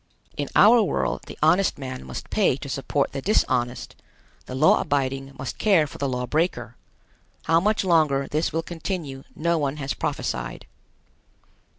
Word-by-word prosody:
In 145 - -3
our 230 +3 +7
world 205 - -1
the - - -9
honest 180 +5 +3
man 130 -2 -6
must - - -8
pay 195 -11 +2
to 140 - -8
support 140 +1 -1
the 135 - -4
dishonest; 125 - 0 0.5
the 130 - -6
law 130 - +4
abiding 135 -1 -2
must 135 - -6
care 190 -8 +4
for 145 - -11
the 140 - -1
law 125 -1 -2
breaker. 125 - -1 0.7
How 165 0 +3
much 210 +4 +1
longer 155 -6 +2
this 155 +2 -1
will 165 +1 -1
continue 160 -5 -5
no 170 +1 +1
one 145 0 -1
has 135 -2 -3
prophesied. - - -4
145 Hz, 160 wpm, -24 LUFS, 135-170 Hz, 0.7 s, our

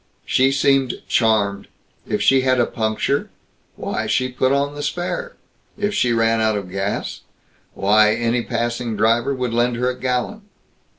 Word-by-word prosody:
She 135 +1 +3
seemed 135 -2 +2
charmed; 100 -4 +1 0.4
if 105 -1 -1
she 135 +5 +4
had 130 -1 +2
a 120 - +4
puncture 110 +5 -1 0.5
why, - - -3
she 130 0 +1
put 130 +1 0
on 140 +1 +1
the 145 - -6
spare. 480 - -3 0.4
If 205 0 -1
she 125 -12 +1
ran 115 -1 +2
out 110 -1 +1
of 95 -3 -6
gas 100 +1 -3 0.5
why, 105 +2 +4
any 120 +1 0
passing 120 -1 -3
driver 115 +5 +2
would 125 -2 -3
lend 120 +1 +1
her 125 +2 0
a - - -7
gallon. 130 - -2
120 Hz, 160 wpm, -20 LUFS, 110-135 Hz, 0.5 s, she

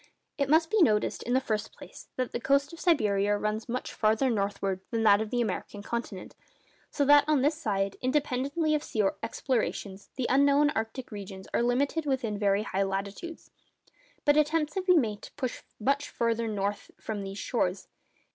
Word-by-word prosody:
It 280 -1 +1
must 320 +2 +4
be 435 - +3
noticed, 215 -9 +2
in 245 - -2
the - - +5
first 215 -5 -2
place, - - -12
that 255 -1 -2
the - - -3
coast 280 +4 +1
of 335 - -10
Siberia 205 - +2
runs 215 +2 -3
much 250 +2 -3
farther 220 +4 +2
northward 200 -2 -1
than 225 -1 -1
that 205 -1 +6
of 220 - -3
the 245 +1 0
American 205 -2 -4
continent. 230 -5 -5 0.5
So 285 - 0
that 290 +1 +7
on 300 -4 +3
this 295 +3 +3
side, 200 -10 -2
independently 280 +3 0
of 300 - +1
sea 215 -7 -1 0.2
explorations, 205 -6 -2
the 260 - -2
unknown 280 +2 +4
arctic 225 +2 -4
regions 195 -2 -8
are - - +2
limited 280 +6 +1
within 250 -6 0
very 200 0 +2
high 195 -2 -2
latitudes. 195 - -4 0.7
But 290 0 +5
attempts 305 0 +2
have 380 -1 -3
been 360 -4 +6
made 210 -3 -4
to - - -11
push 255 -4 -4 0.2
much 280 +6 0
farther 230 0 0
north 205 -1 -2
from 215 -2 -4
these 195 0 -6
shores. 195 -5 -1
235 Hz, 180 wpm, -28 LUFS, 205-285 Hz, 0.7 s, that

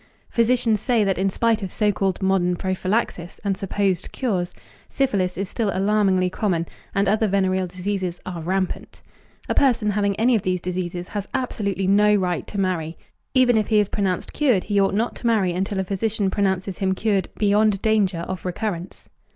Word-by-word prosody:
Physicians 230 -2 +2
say 235 -3 +2
that 195 -2 0
in 195 +1 +2
spite 225 +3 +1
of 190 -3 -4
so 210 -1 +2
called 195 -1 -1
modern 185 -2 +2
prophylaxis 185 -1 -2
and 200 -2 0
supposed 195 -1 -1
cures, 185 -9 -1 0.4
syphilis 195 -9 0
is 195 +1 -2
still 215 +2 -1
alarmingly 195 -1 +2
common, 180 -3 -1 0.3
and 200 0 +2
other 215 +2 +2
venereal 190 -1 +1
diseases 185 -1 -3
are 175 -2 -5
rampant. 185 +2 -3 0.4
A - - 0
person 235 -6 +3
having 200 -1 0
any 235 +5 +3
of 220 - +2
these 185 -1 -1
diseases 180 0 -4
has 205 -2 -4
absolutely 200 -7 -1
no 210 +2 +4
right 180 -3 -1
to 200 - -5
marry. 170 -4 -1 0.4
Even 255 -2 +5
if 215 - +1
he 215 - +3
is 205 -1 +1
pronounced 190 -3 -2
cured, 250 -11 +2
he 205 0 +1
ought 195 0 +1
not 230 +3 0
to 235 - -3
marry 200 -6 +2
until 190 +2 -2
a - - +1
physician 200 +1 -1
pronounces 190 -1 -1
him 190 -1 +1
cured 200 -3 0
beyond 210 -1 +3
danger 205 -6 +2
of 185 +1 -5
recurrence. 180 -1 -4
195 Hz, 180 wpm, -23 LUFS, 185-210 Hz, 0.4 s, Even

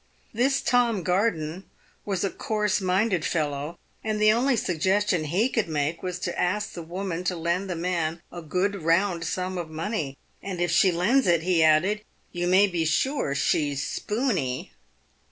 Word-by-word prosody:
This 265 +5 +2
Tom 235 -6 +2
Garden 180 -2 -1 0.4
was 195 -2 -1
a 195 - 0
coarse 210 -2 -1
minded 185 -1 +1
fellow, 150 0 -2 0.3
and 215 -1 -1
the 215 0 +6
only 250 +4 +2
suggestion 185 -1 +1
he 185 +10 +2
could 225 -8 -1
make 150 +1 -1
was 180 -1 -3
to 175 - -2
ask 205 +4 -1
the 170 - -6
woman 180 +1 -4
to 180 - 0
lend 170 +3 -1
the 180 - -2
man 170 -1 -1
a 175 - -7
good 185 +5 -1
round 170 +2 +2
sum 185 +2 -2
of 165 -2 -5
money, 160 -4 -3
" - - -39
and 190 -3 -5
if 175 -1 +1
she 185 +2 +5
lends 205 +10 +2
it," 170 -2 +3
he 175 -2 +2
added, 180 +7 +3 0.2
" - - -39
you 175 0 -2
may 190 +3 +6
be 175 -4 -1
sure 160 - 0
she's 145 -1 0
spoony." 205 - -2
180 Hz, 175 wpm, -26 LUFS, 165-205 Hz, 0.4 s, the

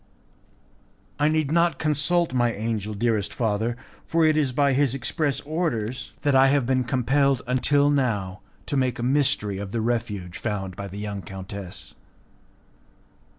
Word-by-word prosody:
"I 145 - +3
need 155 -2 +1
not 170 -3 +3
consult 155 +1 +1
my 120 -2 +2
angel, 110 -1 -3
dearest 110 -1 0
father, 115 +1 -1 0.3
for 165 0 +2
it 155 -1 +4
is 145 -4 +2
by 140 +1 +2
his 135 -1 +2
express 140 +2 -1
orders 130 -7 -3
that 145 -2 +2
I 135 0 +6
have 140 -2 +2
been 130 0 +1
compelled 135 +1 +2
until 140 +3 +2
now 105 -9 -1 0.2
to - - -2
make 130 -3 +1
a 120 - -4
mystery 125 -7 +1
of 100 -1 -6
the 115 - -1
refuge 105 -6 -2
found 95 -4 -3
by 100 - -6
the 100 +1 -9
young 105 -1 -4
countess." 95 0 -8
125 Hz, 150 wpm, -25 LUFS, 105-145 Hz, 0.3 s, I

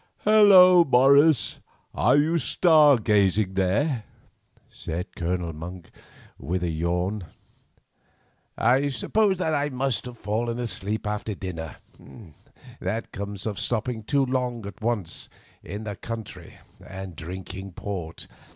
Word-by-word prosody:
"Hullo! 190 -4 +7
Morris, 140 +1 +4 0.3
are - - +3
you 160 +3 +2
star 155 -5 +5
gazing 100 -2 +2
there?" 105 - 0 0.6
said 85 +3 -6
Colonel 85 -1 -2
Monk, 85 +2 -9 0.5
with 90 +2 -3
a 85 - -1
yawn. 90 +5 -2 1.3
"I 135 +3 +3
suppose 195 - +1
that 160 -3 -1
I 145 0 0
must 130 -2 -2
have 125 -1 -9
fallen 115 +3 -2
asleep 110 -3 -3
after 105 0 -3
dinner—that 95 - -8
comes 100 0 -6
of 105 -3 -3
stopping 120 0 -2
too 140 +5 +1
long 125 -3 -2
at 100 - -9
once 110 -7 -3 0.3
in 100 +4 -7
the 105 -2 -5
country 115 -1 -8 0.3
and 95 -2 -8
drinking 95 +3 -8
port. 90 -4 -6
110 Hz, 115 wpm, -25 LUFS, 95-135 Hz, 1.3 s, Hullo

